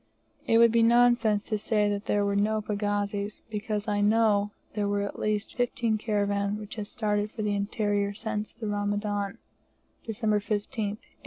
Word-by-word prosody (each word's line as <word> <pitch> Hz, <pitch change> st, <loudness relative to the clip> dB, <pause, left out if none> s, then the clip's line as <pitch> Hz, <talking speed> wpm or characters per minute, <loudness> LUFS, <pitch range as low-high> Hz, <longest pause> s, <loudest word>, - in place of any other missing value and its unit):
It 225 Hz, -, +5 dB
would 230 Hz, 0 st, +7 dB
be 230 Hz, 0 st, +4 dB
nonsense 235 Hz, -2 st, +4 dB
to 215 Hz, -2 st, -2 dB
say 210 Hz, -1 st, +1 dB
there 205 Hz, 0 st, +1 dB
were 200 Hz, 0 st, 0 dB
no 215 Hz, +2 st, +2 dB
pagazis; 205 Hz, 0 st, -2 dB
because 210 Hz, 0 st, -3 dB
I 205 Hz, -1 st, +1 dB
know 210 Hz, -1 st, +3 dB, 0.2 s
there 205 Hz, -1 st, -1 dB
were 200 Hz, 0 st, 0 dB
at 200 Hz, -, -5 dB
least 210 Hz, 0 st, -1 dB
fifteen 240 Hz, -3 st, 0 dB
caravans 205 Hz, -1 st, 0 dB
which 210 Hz, -1 st, -8 dB
had 210 Hz, -2 st, -5 dB
started 210 Hz, -2 st, -1 dB
for 215 Hz, 0 st, -5 dB
the 210 Hz, -1 st, 0 dB
interior 205 Hz, 0 st, 0 dB
since 215 Hz, -1 st, -3 dB
the 225 Hz, -, -8 dB
Ramadan 205 Hz, -1 st, -1 dB, 0.7 s
(December 220 Hz, -1 st, 0 dB
15th, 205 Hz, +3 st, -3 dB, 0.2 s
1870). -, -, -29 dB
210 Hz, 165 wpm, -28 LUFS, 205-220 Hz, 0.7 s, would